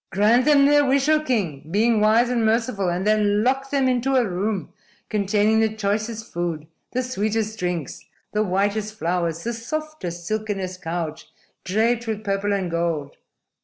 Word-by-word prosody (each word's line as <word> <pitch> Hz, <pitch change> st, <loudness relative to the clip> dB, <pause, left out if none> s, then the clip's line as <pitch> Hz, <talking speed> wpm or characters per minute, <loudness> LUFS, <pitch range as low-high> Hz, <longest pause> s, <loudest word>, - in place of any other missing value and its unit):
"Grant 220 Hz, +6 st, +3 dB
them 290 Hz, -2 st, +5 dB
their 290 Hz, 0 st, +5 dB
wish, 275 Hz, 0 st, +2 dB
O 310 Hz, 0 st, +5 dB
king, 195 Hz, -, -2 dB
being 215 Hz, +4 st, +2 dB
wise 220 Hz, +3 st, +4 dB
and 240 Hz, -2 st, +1 dB
merciful; 220 Hz, -4 st, +1 dB
and 180 Hz, +2 st, -2 dB
then 210 Hz, -1 st, +2 dB
lock 270 Hz, +2 st, 0 dB
them 275 Hz, -2 st, +1 dB
into 255 Hz, +1 st, +1 dB
a 250 Hz, -3 st, +3 dB
room 195 Hz, +1 st, -2 dB, 0.4 s
containing 210 Hz, +1 st, +2 dB
the 220 Hz, -1 st, +1 dB
choicest 220 Hz, +2 st, -2 dB
food, 170 Hz, -3 st, -3 dB, 0.3 s
the 255 Hz, +1 st, -1 dB
sweetest 220 Hz, -2 st, -2 dB
drinks, 175 Hz, -5 st, -3 dB, 0.3 s
the 210 Hz, -, 0 dB
whitest 205 Hz, +2 st, 0 dB
flowers, 170 Hz, -2 st, -1 dB
the 235 Hz, -, -2 dB
softest, 235 Hz, -, -5 dB
silkenest 195 Hz, -3 st, -3 dB
couch 165 Hz, -2 st, -4 dB, 0.3 s
draped 225 Hz, +4 st, +1 dB
with 220 Hz, -1 st, -3 dB
purple 200 Hz, 0 st, -1 dB
and 190 Hz, -4 st, -1 dB
gold. 165 Hz, -4 st, -2 dB
215 Hz, 160 wpm, -23 LUFS, 185-235 Hz, 0.4 s, them